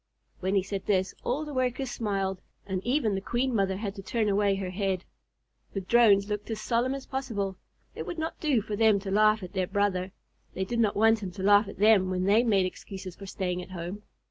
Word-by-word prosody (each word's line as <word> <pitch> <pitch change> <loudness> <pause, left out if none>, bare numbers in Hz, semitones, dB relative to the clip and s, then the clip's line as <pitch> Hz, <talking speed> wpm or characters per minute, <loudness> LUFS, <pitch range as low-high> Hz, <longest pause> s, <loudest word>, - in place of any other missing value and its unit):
When 190 +2 0
he 195 - +3
said 195 0 -5
this, 190 -2 +1
all 285 +5 -1
the 300 - -7
Workers 255 0 -1
smiled, 195 -4 -2 0.2
and 190 -1 -3
even 245 -4 +1
the 195 - -2
Queen 245 +5 -1
Mother 195 -3 +1
had 200 -1 -4
to 200 - -8
turn 215 +2 0
away 200 0 +2
her 190 -2 -4
head. 190 -1 -1 0.7
The 195 - -2
Drones 200 -1 +5
looked 210 +1 -4
as 220 -1 -3
solemn 240 +4 0
as 275 - -7
possible. 205 -8 -3 0.4
It - - -6
would 350 - -5
not 320 +1 -4
do 275 -9 +1
for 210 -1 -4
them 220 -1 +4
to 195 -1 -5
laugh 215 0 +4
at 180 - -8
their 185 -2 0
brother. 195 -2 0 0.4
They 190 - -1
did 235 +4 -2
not 215 -3 +2
want 225 +1 +4
him 195 - -4
to 190 0 -6
laugh 205 +1 +5
at 200 - -9
them 205 -2 +5
when 185 0 -1
they 205 +4 +5
made 205 -6 +3
excuses 185 0 -7
for 195 - -10
staying 180 -2 -2
at 180 - -10
home. 185 +3 -6
205 Hz, 225 wpm, -28 LUFS, 190-225 Hz, 0.7 s, Drones